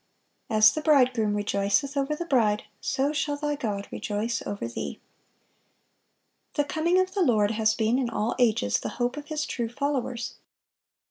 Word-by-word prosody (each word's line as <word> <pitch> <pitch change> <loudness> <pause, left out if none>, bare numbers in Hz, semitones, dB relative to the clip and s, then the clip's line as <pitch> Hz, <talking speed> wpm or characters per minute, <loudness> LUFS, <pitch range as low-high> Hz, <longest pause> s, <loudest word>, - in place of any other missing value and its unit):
"As 215 -1 +6
the 310 - -3
bridegroom 255 -8 +3
rejoiceth 205 +7 0
over 280 +2 0
the 345 - -5
bride, 220 -9 +2 0.2
so 275 +2 0
shall 290 0 -1
thy 295 0 -1
God 210 -8 -3
rejoice 215 +3 -2
over 200 -11 -3
thee."(464) 115 - -13
The 290 - +2
coming 325 +5 +1
of 370 0 0
the 395 - 0
Lord 215 - +3
has 220 0 +2
been 230 +3 +1
in 250 -3 0
all 225 0 -1
ages 210 - +2
the - - -4
hope 245 +1 0
of 295 0 -8
His 305 -1 -2
true 235 -2 -3
followers. 255 -2 -3
245 Hz, 160 wpm, -26 LUFS, 215-290 Hz, 0.2 s, As